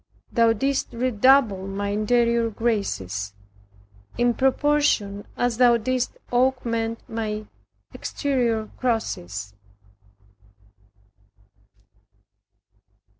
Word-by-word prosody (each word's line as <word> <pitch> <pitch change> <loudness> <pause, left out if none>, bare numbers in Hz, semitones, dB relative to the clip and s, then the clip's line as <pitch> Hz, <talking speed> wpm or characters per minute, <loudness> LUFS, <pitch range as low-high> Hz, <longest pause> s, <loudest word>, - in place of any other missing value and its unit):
Thou 230 -1 +4
didst 275 +5 -1
redouble 235 -4 +3
my 200 +1 -3
interior 235 +2 +2
graces, 105 - -2 0.8
in 240 0 +3
proportion 265 -7 +1
as 245 -2 0
Thou 240 -1 +5
didst 250 +2 -2
augment 240 -2 0
my 215 -2 -3 0.5
exterior 240 -6 -1
crosses. 100 - -2
230 Hz, 70 wpm, -24 LUFS, 205-250 Hz, 0.8 s, Thou